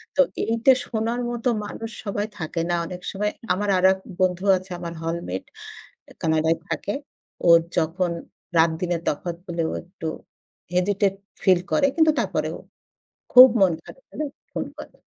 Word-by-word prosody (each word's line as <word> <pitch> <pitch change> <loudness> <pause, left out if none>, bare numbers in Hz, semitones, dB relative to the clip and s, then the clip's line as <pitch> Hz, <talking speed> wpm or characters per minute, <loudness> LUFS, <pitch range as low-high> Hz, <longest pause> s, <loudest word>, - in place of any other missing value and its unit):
তো - - +6 0.2
এইটা 230 +3 +4
শোনার 230 +1 -2
মতো 240 +1 -1 0.2
মানুষ 225 +2 -6 0.2
সবাই 205 +1 -2
থাকে 165 +1 -2
না 175 - +2
অনেক 180 +1 -7
সময়। 210 +1 -1 0.2
আমার 205 +2 -1
আরেক 190 +1 +4 0.2
বন্ধু 185 +1 +1
আছে, 185 0 -11
আমার 170 -1 -5
হলমেট। 165 - -3 0.8
কানাডায় 160 0 +2
থাকে। 205 - -2 0.5
ওর 170 0 +9 0.2
যখন, 170 +2 +1 0.5
রাতদিনের 165 +1 +2
তফাত 170 +3 -1
বলে 170 -1 -1
ও - - -4
একটু 175 -2 -8 0.7
হেজিটেট 195 +2 +2 0.3
ফিল 185 -3 +5
করে, 280 -2 +4
কিন্তু 315 -1 +5
তারপরেও - - -1 0.8
খুব 255 +1 +12
মন 185 -3 +6
খারাপ - - -14
হলে 305 - -3 0.3
ফোন - - -3
করে। - - -10
185 Hz, 145 wpm, -24 LUFS, 170-210 Hz, 0.8 s, খুব